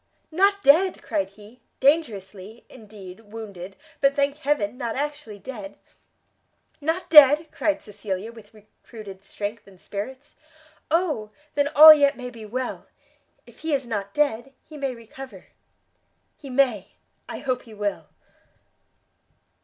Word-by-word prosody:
"Not 395 +4 +2
dead," 345 +7 +4
cried 200 -4 -2
he; 210 +4 -17 0.2
"dangerously, 220 - -1
indeed, 205 -6 -12
wounded, 205 -4 -10 0.2
but 275 0 +3
thank 280 0 0
heaven, 275 -8 -1
not 235 -2 -4
actually 290 -6 -5
dead!" 205 -3 -9 1.0
"Not 325 +5 -2
dead?" 300 +1 +7
cried 305 -1 -1
Cecilia, 205 0 -6
with 225 -2 -15
recruited 215 -2 -13
strength 205 +2 -6
and 190 -2 -18
spirits, 260 +10 -8 0.5
"Oh 305 -10 0 0.2
then 285 0 +1
all 310 +2 +12
yet 285 -2 +2
may 250 -1 -7
be 225 -3 -11
well! 255 +4 -5 0.6
if - - -19
he 320 -2 0
is 270 -2 -3
not 205 -4 -4
dead; 270 -3 0
he 310 - -13
may 275 -3 -3
recover!" 245 +3 -12 0.9
"He 280 - -12
may; 250 -7 +1 0.4
I - - -5
hope 255 -2 -2
he 225 -2 -13
will!" 205 -1 -3
245 Hz, 130 wpm, -24 LUFS, 205-285 Hz, 1.0 s, all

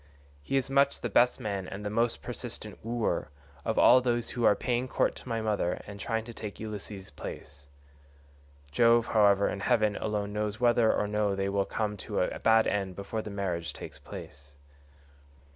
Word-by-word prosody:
He 135 - -1
is 135 - 0
much 140 0 +3
the 120 - -3
best 125 +5 +4
man 100 -5 -3
and 100 +2 -7
the 105 - -2
most 115 +2 0
persistent - - -6
wooer, 115 0 -1 0.3
of - - -1
all 125 +1 +7
those 120 -2 0
who 120 - -3
are 105 - +6
paying 125 0 -1
court - - +1
to - - -11
my 115 -1 -1
mother 105 -5 0
and 100 0 -9
trying 115 +1 -2
to 120 - -8
take 105 -2 -7
Ulysses' 105 -3 -6
place. 70 0 -9 1.0
Jove, 115 +7 +5
however, 100 -2 +4
in 100 - -3
heaven 110 -1 +2
alone 105 -1 -2
knows 105 0 -2
whether 120 -2 +4
or 105 - 0
no 105 -1 0
they 95 0 -1
will 100 0 +1
come 105 -2 -2
to - - -3
a - - -1
bad 110 0 +5
end 95 -3 -1
before 100 +3 -4
the 105 - -7
marriage 90 -4 -3
takes - - -9
place." 70 -1 -11
105 Hz, 185 wpm, -29 LUFS, 100-115 Hz, 1.0 s, all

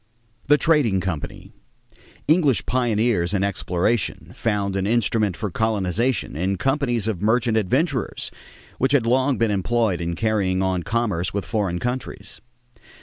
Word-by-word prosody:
=The 145 +1 +6
Trading 145 - +2
Company.= 90 -5 -5 0.8
English 150 -6 +3
pioneers 110 -6 +1
in 95 - +1
exploration 100 +2 -1
found 100 -3 -1
an 95 0 0
instrument 110 -4 +1
for 105 -2 -3
colonization 110 - 0
in 95 +5 -1
companies 130 -5 0
of 105 -5 -2
merchant 115 +2 +2
adventurers, 130 - 0 0.5
which 135 +2 +2
had 130 -5 +3
long 130 +3 +2
been 115 -2 +1
employed 105 -1 0
in 85 0 -2
carrying 95 -3 0
on 95 -1 0
commerce 100 -4 -1
with 100 -3 -2
foreign 100 -6 -1
countries. 125 +6 -5
110 Hz, 135 wpm, -22 LUFS, 95-120 Hz, 0.8 s, =The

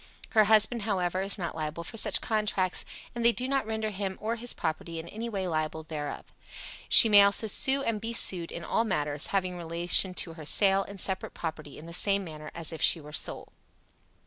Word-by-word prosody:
Her 215 -2 +4
husband, 220 +2 +4
however, 185 -3 -2
is 195 +1 -1
not 175 -3 -4
liable 155 +1 -5
for 180 - -9
such 225 - +1
contracts, 210 -5 -1 0.3
and 240 - -4
they 235 - +5
do 250 +2 -3
not 270 -4 -1
render 220 -1 -3
him 195 -1 -4
or 225 +2 -3
his 235 +1 -3
property 165 +1 -4
in 160 +1 -7
any 225 +5 -6
way 195 -4 -3
liable 155 -1 -3
therefor. 150 -2 -7 0.6
She - - +9
may 205 -2 +7
also 200 +2 +3
sue 265 +6 +2
and 220 -4 -2
be 225 +1 -4
sued 180 -7 -1
in 170 - -7
all 225 - 0
matters 150 -8 -2
having 185 -2 -2
relation 175 +2 +2
to 165 - 0
her 160 -2 -11
sale 195 +5 +3
and 200 0 -9
separate 190 0 0
property 155 -3 -7
in 155 - -11
the 170 - -9
same 200 +2 +3
manner 155 -3 -9
as 165 -1 -1
if 160 - -8
she 170 - +6
were 150 -1 -13
sole. - - -3
190 Hz, 210 wpm, -28 LUFS, 165-215 Hz, 0.6 s, She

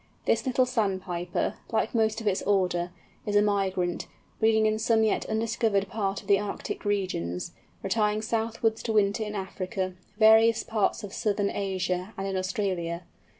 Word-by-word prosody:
This - - +1
little 255 0 +3
Sandpiper, 190 -7 -1
like - - 0
most 220 -1 +2
of 220 - -4
its 190 -2 +1
order, 180 -3 +1 0.4
is 205 - 0
a 205 - +6
migrant, 190 -4 0 0.3
breeding 220 0 +4
in 215 0 +1
some 225 0 +3
yet 215 - +1
undiscovered 220 -2 +1
part 200 -2 -2
of - - -18
the 200 -1 +5
Arctic 205 -1 -4
regions, 180 - -1 0.3
retiring 210 +1 +1
southwards 225 0 0
to 225 - -2
winter 205 0 +2
in 210 0 -5
Africa, 190 -1 -3 0.2
various 220 +1 +6
parts 220 0 0
of 200 - -7
southern 205 -1 0
Asia 185 0 -2
and 195 - -3
in 195 -1 -2
Australia. 185 -3 -2
205 Hz, 155 wpm, -27 LUFS, 190-220 Hz, 0.4 s, a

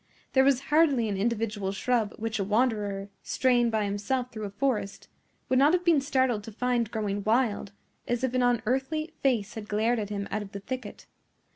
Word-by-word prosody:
There 265 - +5
was 270 -1 +3
hardly 285 -8 +4
an 200 - -1
individual 210 -1 -1
shrub 220 +1 0
which 225 0 -3
a - - +1
wanderer, 205 -2 0
straying 245 -2 +2
by 220 -2 0
himself 205 +6 -2
through 215 -1 -5
a - - -4
forest, 210 -2 -2 0.4
would 255 - +3
not 290 +4 +5
have 360 0 +1
been 330 -5 +4
startled 260 -5 +1
to 225 - -8
find 240 0 0
growing 205 -3 -2
wild, 220 -3 +1 0.4
as 240 +1 -1
if 260 -1 0
an 255 - +2
unearthly 265 +7 0
face 235 -7 +1
had 215 -2 -7
glared 220 +3 +1
at 205 -2 -4
him 200 -1 -3
out 215 - -1
of 200 -1 -9
the 200 - -5
thicket. 245 0 -7
230 Hz, 190 wpm, -28 LUFS, 205-260 Hz, 0.4 s, There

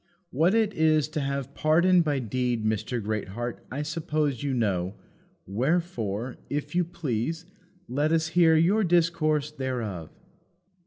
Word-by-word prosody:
What 165 - +3
it 220 -2 +2
is 155 -2 +3
to 155 - -3
have 140 -1 -3
pardon 175 +4 +4
by 150 -4 0
deed, 125 -2 -1
Mr. 110 +3 -1
Greatheart, 110 +3 -4
I 140 +3 -2
suppose 150 -4 -1
you 145 - -1
know; 100 -6 0 0.5
wherefore, 120 - -1
if 145 +1 -3
you 180 0 +3
please, 165 -1 -3 0.4
let 145 +5 0
us 165 0 +2
hear 165 -1 +5
your 185 +7 +3
discourse 160 -4 +2
thereof." 120 - -4
145 Hz, 135 wpm, -27 LUFS, 120-165 Hz, 0.5 s, hear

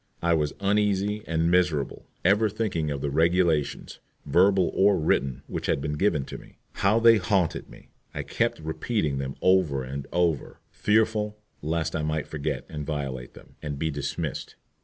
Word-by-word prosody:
I 85 0 +3
was 75 -3 0
uneasy 105 +1 +1
and 80 +1 +1
miserable, 85 -6 +1 0.2
ever 105 +4 +4
thinking 100 -7 -2
of 70 -2 -3
the 70 - -2
regulations, 85 -1 +1 0.3
verbal 95 0 +4
or 100 0 +4
written, 70 -4 0
which - - -5
had - - +1
been 75 +2 -3
given 75 -4 +1
me. - - -17
How 105 +4 +2
they 115 -1 +7
haunted 95 -3 0
me! - - -16 0.2
I - - -4
kept - - -1
repeating 80 - -2
them 70 0 -4
over 90 -8 +3
and 70 +2 -6
over, 85 -4 0
fearful 105 -1 +1 0.2
lest 80 +2 -1
I 80 - -1
might 75 0 -1
forget 75 -3 -4
and 75 -1 -6
violate 70 -4 -4
them, - - -16
and 75 -2 -4
be 80 +2 -1
dismissed. 70 -1 -4
80 Hz, 160 wpm, -26 LUFS, 75-100 Hz, 0.3 s, they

